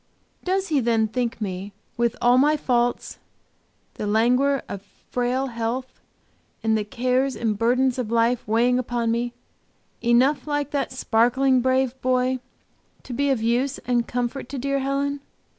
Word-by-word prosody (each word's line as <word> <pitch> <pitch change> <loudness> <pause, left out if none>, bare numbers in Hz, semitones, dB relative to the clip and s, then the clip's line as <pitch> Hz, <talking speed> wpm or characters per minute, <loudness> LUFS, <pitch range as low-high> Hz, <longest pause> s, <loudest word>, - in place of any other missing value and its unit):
Does 380 +1 0
he 300 -3 +2
then 230 -2 +2
think 235 +1 -2
me, 195 -1 -5 0.2
with 235 -1 0
all 245 +1 +4
my 300 +3 +4
faults, 245 -3 0 0.7
the 210 - -4
languor 250 +6 +2
of 200 - -6 0.3
frail 250 +2 0
health, 240 +1 -4 0.6
and 220 0 +2
the 215 - 0
cares 255 +5 0
and 220 -2 -1
burdens 250 +4 +2
of 235 -4 -2
life 235 +1 +1
weighing 240 +3 +3
upon 240 -2 -1
me, 240 +1 -1 0.7
enough 255 +4 +3
like 290 -1 -1
that 285 -2 -1
sparkling, 255 +2 +2
brave 260 0 +2
boy 255 0 +1 0.6
to 250 - -7
be 280 +4 +1
of 255 -5 +1
use 245 +4 +1
and 240 -2 +1
comfort 245 +1 -3
to 280 - -5
dear 275 +2 -1
Helen? 280 +1 -1
250 Hz, 150 wpm, -24 LUFS, 235-265 Hz, 0.7 s, all